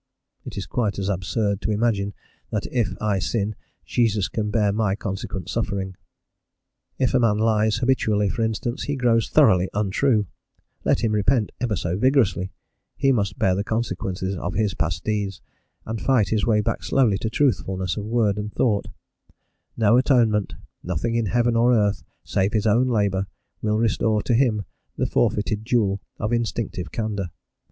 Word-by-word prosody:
It - - -7
is - - -3
quite 110 -5 -1
as 100 0 -2
absurd 100 +2 -1
to 90 - -2
imagine 105 -2 0 0.3
that - - -2
if 105 -7 -1
I 105 -2 0
sin 105 +4 -1 0.3
Jesus 110 -5 +1
can 105 -2 -2
bear 105 -1 +2
my 105 -2 +1
consequent 95 -2 -5
suffering. 95 -1 -2 1.0
If 130 - +1
a 130 - +4
man 115 -3 +3
lies 110 -1 +2
habitually, 110 -5 +1
for 115 - -2
instance, 115 +2 -2
he 145 - -1
grows 120 -4 +2
thoroughly 90 0 +4
untrue: 105 +2 +2 0.6
let - - +1
him 110 - +2
repent 105 +2 +2
ever 120 -4 0
so 90 0 -2
vigorously, 115 -8 +2 0.5
he 135 - +3
must 100 -6 0
bear 95 - +2
the 100 +2 -1
consequences 95 -4 -2
of 90 +1 -4
his 105 -2 +1
past 80 -1 -2
deeds, 105 -3 -2 0.5
and 110 0 -4
fight 120 -8 +2
his 110 0 +1
way 105 -2 +3
back - - -2
slowly 115 -8 +2
to 110 - -2
truthfulness 95 -8 0
of 105 - -4
word 110 -3 +1
and 105 0 -4
thought: 105 -5 +1 0.9
no 115 +1 +4
atonement, 115 -6 +2 0.3
nothing 90 +6 -2
in 115 -2 +1
heaven 120 +3 +2
or 120 +2 +4
earth 105 -2 +1 0.2
save 95 +1 0
his 110 -1 +1
own 115 +4 +3
labour, 100 -5 +1 0.3
will 105 0 +1
restore 110 -1 +1
to - - 0
him 115 -5 +2 0.3
the - - +1
forfeited 105 0 0
jewel 105 -4 +1 0.2
of 110 +2 -2
instinctive 110 -7 -2
candour. 105 -4 -3
105 Hz, 165 wpm, -23 LUFS, 100-115 Hz, 1.0 s, a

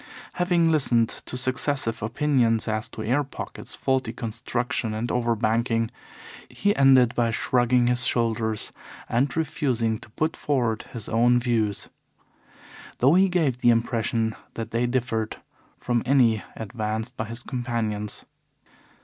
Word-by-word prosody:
Having 175 -2 +2
listened 120 -7 +3
to 125 - -5
successive 130 -2 0
opinions 120 -1 +1
as 110 -1 -2
to 110 - -7
air 130 +7 +1
pockets, 140 - -8
faulty 130 -3 0
construction, 115 -1 -3
and 115 +2 -2
over 120 -1 +1
banking, 115 +1 0 0.6
he 205 0 0
ended 130 -3 +5
by 120 -1 +1
shrugging 120 +2 +2
his 125 +1 +3
shoulders 110 -2 0 0.4
and 130 +6 0
refusing 125 -8 0
to - - -14
put 155 +8 -1
forward 120 -6 -1
his 115 -4 -6
own 120 +2 +3
views, 115 -4 -1 1.1
though 135 +5 +4
he 190 +2 +5
gave 155 -9 +1
the 120 - +4
impression 115 -1 +1 0.2
that 115 -1 -5
they 120 +1 +1
differed 115 -3 -1 0.4
from 120 -2 0
any 120 -6 +3
advanced 110 +2 -4
by 110 - -3
his 115 +2 -6
companions. 115 -5 -3
120 Hz, 130 wpm, -25 LUFS, 110-130 Hz, 1.1 s, ended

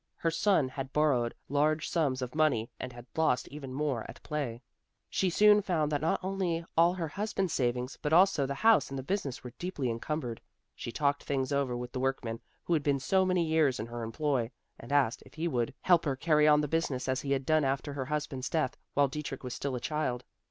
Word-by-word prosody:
Her 165 - 0
son 165 -4 +3
had 135 +1 -6
borrowed 135 -6 +2
large 155 +2 +1
sums 135 -6 0
of 125 - -5
money 150 -8 +2
and 130 - -5
had 120 -1 -11
lost 155 -7 +2
even 140 -2 -8
more 135 -4 -1
at - - -11
play. 135 -5 -3 0.5
She 190 - +1
soon 210 +3 +6
found 160 -6 0
that 145 -2 0
not 160 - +1
only 185 -3 -1
all 170 +2 +5
her 170 -3 -2
husband's 195 0 -2
savings, 125 +1 -1
but 150 - -1
also 170 -5 +5
the 140 - -3
house 225 +6 +4
and 135 - -5
the 130 - -4
business 145 -5 -3
were 125 -2 -8
deeply 150 -9 -2
encumbered. 120 0 -3 0.3
She 120 - -6
talked 140 +4 +1
things 135 -1 -1
over 140 -3 0
with 125 0 -6
the 130 - -4
workman 125 -3 -1 0.2
who 175 - 0
had 160 - +3
been 145 -1 +1
so 190 +8 +2
many 180 -2 +2
years 155 -5 +2
in 110 - -3
her 120 0 -6
employ 120 0 -1 0.3
and 120 - -10
asked 140 -5 +2
if - - -18
he 160 +2 -1
would 125 -4 0
help 175 -3 +4
her 140 -3 0
carry 150 +1 +3
on 150 0 +6
the 150 - -1
business 145 -5 -1
as 130 0 0
he 140 -1 0
had 135 -1 -1
done 155 0 +3
after 135 +2 -1
her 135 -2 -3
husband's 145 -2 -3
death 150 -5 0 0.2
while 145 0 +4
Dietrich 140 -1 -5
was 125 -1 -4
still 140 -2 -3
a - - -2
child. 125 -3 -2
145 Hz, 220 wpm, -30 LUFS, 130-160 Hz, 0.5 s, soon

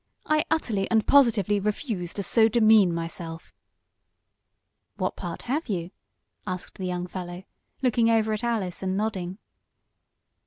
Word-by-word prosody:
I 305 0 +2
utterly 225 -11 0
and 220 -2 +2
positively 220 -7 +4
refuse 205 - -2
to 200 - -3
so 220 +4 +4
demean 220 -4 +5
myself." 165 0 -6 1.4
"What - - -2
part - - -6
have 275 +3 -2
you?" 175 -3 -3 0.6
asked 185 0 -6
the 185 - -2
young 180 0 -2
fellow, 180 0 -7 0.4
looking 235 -2 +3
over 220 -1 +2
at 215 - -3
Alice 215 -7 -1
and 190 0 -1
nodding. 190 -4 -2
205 Hz, 130 wpm, -26 LUFS, 180-225 Hz, 1.4 s, demean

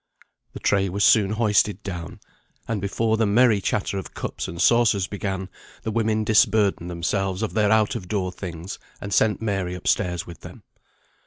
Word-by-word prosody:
The - - -7
tray 100 -1 +1
was 100 +3 -1
soon 100 -2 +5
hoisted 105 -2 +1
down, 85 -4 -6 0.5
and 110 -3 -2
before 110 +3 0
the 110 -1 +2
merry 110 -1 +4
chatter 100 0 -1
of 95 - -10
cups - - -4
and 85 - -7
saucers 110 -2 +4
began, 95 -1 -4 0.4
the 110 - -2
women 110 -1 +1
disburdened 105 -4 +2
themselves 95 +3 -2
of 110 - -3
their 105 -2 +2
out 110 -1 +3
of 90 - -6
door 95 -2 -1
things, 90 0 -7 0.2
and 100 0 -5
sent 110 +2 +2
Mary 95 -4 -1
up 90 - -8
stairs 90 -4 0
with 85 - -11
them. - - -12
100 Hz, 175 wpm, -23 LUFS, 95-110 Hz, 0.5 s, soon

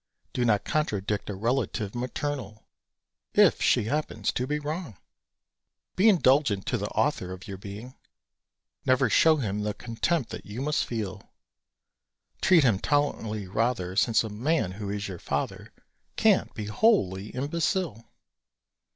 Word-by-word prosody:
Do 125 - 0
not 105 -3 +2
contradict 105 -10 -1
a 100 - -3
relative 110 -2 -1
maternal, 125 -3 -4 0.7
If - - +5
she - - +3
happens 150 +8 -1
to 125 - -2
be 150 +2 0
wrong! 150 - -5 1.0
Be 210 +4 +5
indulgent 135 - +3
to - - -1
the - - -2
author 90 - 0
of 95 +1 -9
your 100 -2 -6
being; 105 +6 -8 0.9
Never 130 -2 +3
show 160 +7 +6
him 105 -8 -2
the 105 0 -2
contempt 125 +4 -1
that - - -6
you 105 +4 -7
must 150 +3 0
feel; 100 -4 -5 1.1
Treat 175 -5 +5
him 115 -7 +3
tolerantly, 115 -8 0
rather, 105 -2 -1
Since 115 +3 +3
a 110 - -5
man 120 - 0
who 100 +1 -6
is 100 0 -3
your 90 -3 -7
father 70 -3 -3 0.4
Can't - - +3
be 105 - -4
wholly 105 - +2
imbecile! 150 - -1
115 Hz, 140 wpm, -27 LUFS, 100-145 Hz, 1.1 s, show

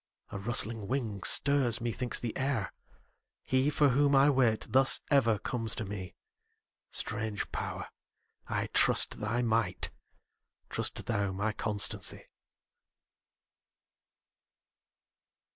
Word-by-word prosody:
a 100 - -5
rustling 110 -1 -1
wing 115 -6 -2
stirs, 135 -3 +2
methinks, 120 +1 -1
the 115 -2 -4
air: 135 -7 -1 0.7
He 130 +2 +1
for 145 -1 +3
whom 140 +2 +3
I 140 +2 +6
wait, 125 -5 +2
thus 135 +1 +5
ever 115 -6 +4
comes 115 0 -3
to 110 - -4
me; 95 -3 -7 0.7
Strange 105 -1 -3
Power! - - -4 0.6
I - - -1
trust - - +3
thy 115 +4 -1
might; 110 -5 0 0.8
trust - - -3
thou 100 -1 -1
my 105 +3 -2
constancy. 105 -2 -1
115 Hz, 105 wpm, -30 LUFS, 105-135 Hz, 0.8 s, I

